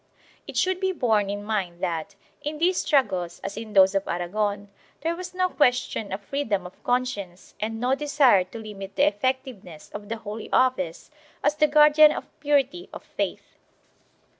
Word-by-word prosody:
It - - -6
should 370 0 +1
be 380 0 +1
borne 220 - +1
in 205 0 -4
mind 195 -5 -2
that, 175 +2 -3 0.3
in 300 +1 -4
these 355 +3 +2
struggles 185 - 0
as 200 - -5
in 220 -1 -7
those 190 -1 +6
of 195 0 -1
Aragon, 205 +3 -2 0.3
there 330 +1 -1
was 365 +1 -8
no 370 0 +2
question 245 - +1
of 195 +2 -4
freedom 210 -6 -2
of 180 - -12
conscience 225 -8 -2
and 225 +1 -3
no 250 +2 +1
desire 275 -8 +4
to 185 - -10
limit 200 -3 -8
the - - +4
effectiveness 210 - -3
of 205 0 -8
the 230 - -3
Holy 220 0 -7
Office 190 - +1 0.3
as - - +3
the 305 0 +3
guardian 300 0 +7
of - - -4
purity 290 +4 0
of - - -9
faith. - - -5
225 Hz, 170 wpm, -25 LUFS, 195-290 Hz, 0.3 s, guardian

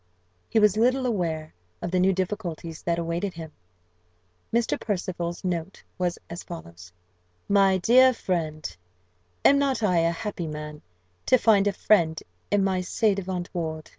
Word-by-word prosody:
He - - 0
was 210 -1 +4
little 255 +3 +2
aware 165 -9 -2 0.3
of 175 - -4
the 185 - +2
new 190 +1 +4
difficulties 175 -4 -4
that 170 -1 0
awaited 170 +3 -2
him. 160 -2 -8 1.0
Mr. 235 0 +1
Percival's 175 -4 -3
note 180 0 -3 0.2
was 180 -1 0
as 170 +2 -7
follows: 90 - -10 0.6
"My 195 -2 +4
dear 255 +7 +6
friend! 165 -9 -3 0.7
"Am 280 - +6
not 270 -4 0
I 180 -4 +3
a 165 0 +2
happy 175 -1 -4
man, 150 0 -7 0.5
to 255 - +6
find 205 -4 +4
a - - +3
friend 170 -6 +2 0.3
in 205 -1 +2
my 190 -1 +1
ci 210 +3 +1
devant 185 -2 -4
ward? 160 -3 -4
180 Hz, 150 wpm, -26 LUFS, 165-205 Hz, 1.0 s, dear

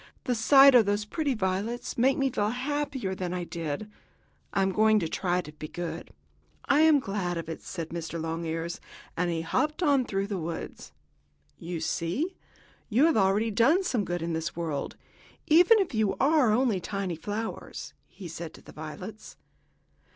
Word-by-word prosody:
The 250 - 0
sight 270 +4 +7
of 235 -4 +6
those 205 +1 0
pretty 285 +3 -1
violets 205 +4 -2
makes 260 +3 +3
me 270 -1 +1
feel 210 -4 0
happier 265 -3 -2
than 180 -1 -3
I 180 - -2
did. 165 +2 -4 0.6
I 195 - +1
am 190 - +1
going 215 +2 +4
to 175 -6 0
try 180 +2 0
to 150 - -11
be 155 0 -8
good." 175 +2 -6 0.6
"I 280 - +3
am 315 -2 +6
glad 195 -7 -2
of 165 - -5
it," 165 - -6
said 165 -3 -6
Mr. 170 0 -5
Longears, 165 +1 -3 0.3
as 175 +1 0
he 165 -1 -1
hopped 305 - -1
on 280 -5 +3
through 195 -2 -1
the 200 -2 -3
woods. 165 0 -6 0.7
"You 170 0 -5
see, 180 - -2 0.5
you 245 +7 +4
have 330 - +3
already 205 +2 +2
done 265 - +4
some 245 - 0
good 175 -2 -3
in 165 0 -2
this 160 +1 -3
world, 160 -4 -3 0.5
even 355 +8 +6
if 385 -8 0
you 220 -3 +1
are 285 -3 +3
only 230 -3 +2
tiny 190 -1 -3
flowers," 210 +7 -5
he 190 - -10
said 165 0 -7
to - - -14
the - - -13
violets. 185 +8 -9
200 Hz, 175 wpm, -28 LUFS, 170-255 Hz, 0.7 s, sight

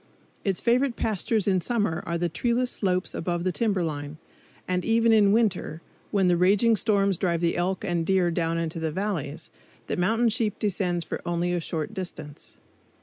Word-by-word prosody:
Its 195 -3 0
favorite 245 +1 +2
pastures 215 0 0
in 190 -2 +2
summer 205 -7 0
are 170 - -1
the 175 +1 0
treeless 240 +8 0
slopes 185 -2 -1
above 175 0 -2
the 185 - +1
timber 200 -3 0
line; 145 -1 -4 0.5
and 180 0 0
even 230 0 +3
in 205 -2 +5
winter, 205 -7 +1 0.3
when 195 -3 +2
the 175 - +4
raging 200 +6 +4
storms 200 -3 +1
drive 170 -2 0
the 170 0 +1
elk 185 +3 -1
and 175 -3 0
deer 180 -1 +2
down 165 -1 -1
into 165 0 -3
the 160 -1 -1
valleys, 165 -5 -4 0.3
the - - -2
mountain 225 +6 +2
sheep 220 -2 -1
descends 180 -4 -1
for - - -5
only 175 +1 -1
a 175 - 0
short 160 +4 -3
distance. 175 -7 -8
185 Hz, 180 wpm, -26 LUFS, 170-215 Hz, 0.5 s, in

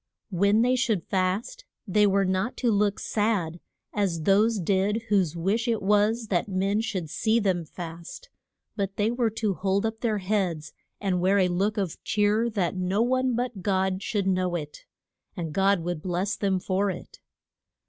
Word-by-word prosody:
_" - - -2
When 200 +5 +4
they 250 +1 +3
should 235 -8 0
fast 195 - -1 0.2
they 210 +2 +4
were 195 0 +2
not 190 +6 -1
to 240 -3 +1
look 205 0 +2
sad 200 -6 -1 0.3
as 185 -6 -1
those 210 +4 +3
did 200 +5 +1
whose 185 -6 +2
wish 200 +8 0
it 230 -2 +1
was 210 +3 +2
that 180 +2 +1
men 195 +3 +1
should 195 -7 -3
see 220 +8 +1
them 185 -5 0
fast, 170 - -9 0.4
but 195 -2 -2
they 215 +2 +1
were 240 -1 +1
to 215 -2 -1
hold 190 +4 0
up 220 0 -3
their 220 -3 0
heads 185 -6 -1 0.3
and 185 -3 0
wear 190 +2 +3
a 185 -2 +3
look 195 +4 0
of 190 -5 -3
cheer 210 +3 +2
that 195 -5 -1
no 185 +4 +1
one 255 0 +1
but 240 -4 -3
God 190 0 0
should 200 -1 -1
know 185 -2 +1
it. 150 -3 -6 0.5
And 165 -3 -4
God 195 0 +3
would 175 -2 -3
bless 185 +3 -1
them 195 -2 0
for 190 +2 0
it. 180 - -8
200 Hz, 180 wpm, -26 LUFS, 185-215 Hz, 0.5 s, When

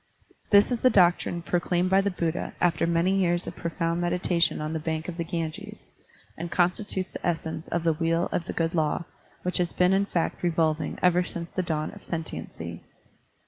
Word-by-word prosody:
This 205 +3 +6
is 240 - -1
the 255 - +6
doctrine 175 -3 +3
proclaimed 175 +1 0
by 195 +1 +6
the 200 - 0
Buddha 170 -2 -2
after 170 -2 +2
many 170 +3 +2
years 175 -2 +1
of - - -6
profound 170 0 -2
meditation 175 0 +1
on 155 +1 -3
the 160 - -1
bank 160 0 -3
of 180 - -4
the 170 - -2
Ganges, 165 -2 -5 0.4
and 170 +1 -5
constitutes 185 +2 0
the - - -8
essence 160 -2 -2
of 170 -1 -1
the 165 -1 +3
Wheel 165 +2 +1
of 170 - -1
the - - -4
Good 165 0 0
Law 160 0 0 0.4
which 180 0 -1
has 175 -1 0
been 180 +1 +3
in 200 +1 +2
fact 170 -4 -1
revolving 160 -2 0
ever 180 0 +4
since 170 -1 -6
the 185 - -1
dawn 155 -3 -2
of - - -13
sentiency. 85 - -6
170 Hz, 190 wpm, -27 LUFS, 165-180 Hz, 0.4 s, This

